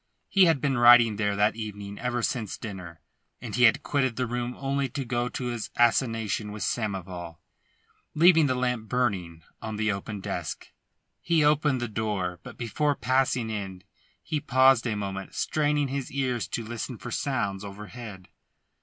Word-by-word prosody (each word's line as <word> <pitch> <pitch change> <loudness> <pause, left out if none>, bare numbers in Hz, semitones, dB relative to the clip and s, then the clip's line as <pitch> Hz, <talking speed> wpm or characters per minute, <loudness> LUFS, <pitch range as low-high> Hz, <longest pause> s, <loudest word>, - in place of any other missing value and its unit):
He 195 -2 +5
had 165 -5 +3
been 135 -2 0
writing 120 -3 +7
there 105 -1 0
that 105 +2 +2
evening 105 -2 -7
ever 120 -1 -2
since 110 -6 -2
dinner, 90 -7 -8 0.4
and - - -7
he 125 0 +5
had 145 +6 +4
quitted 130 -4 0
the 125 - -1
room 120 +1 -3
only 140 0 -1
to 135 +2 -4
go 120 0 -1
to 125 - -5
his 120 -3 -4
assignation 115 -3 +1
with 105 0 -5
Samoval, 90 -6 -3 0.8
leaving 165 -1 +6
the 130 - +1
lamp 125 -3 -1
burning 95 -10 -1 0.2
on 110 -1 -5
his 110 -1 +1
open 100 +1 -5
desk. - - -5 0.5
He 165 -3 +2
opened 150 -3 +3
the 120 - -1
door, 105 -5 -2
but - - -11
before 145 +5 0
passing 130 -2 +1
in 95 -3 -5 0.4
he 155 - -2
paused 130 -2 +4
a 110 - -1
moment, 95 -1 -5
straining 150 -2 +1
his 135 -1 -3
ears 130 -4 -1
to 115 - -4
listen 120 +2 -5
for 125 - -8
sounds 105 -9 -2
overhead. 105 -1 -9
120 Hz, 165 wpm, -27 LUFS, 105-130 Hz, 0.8 s, writing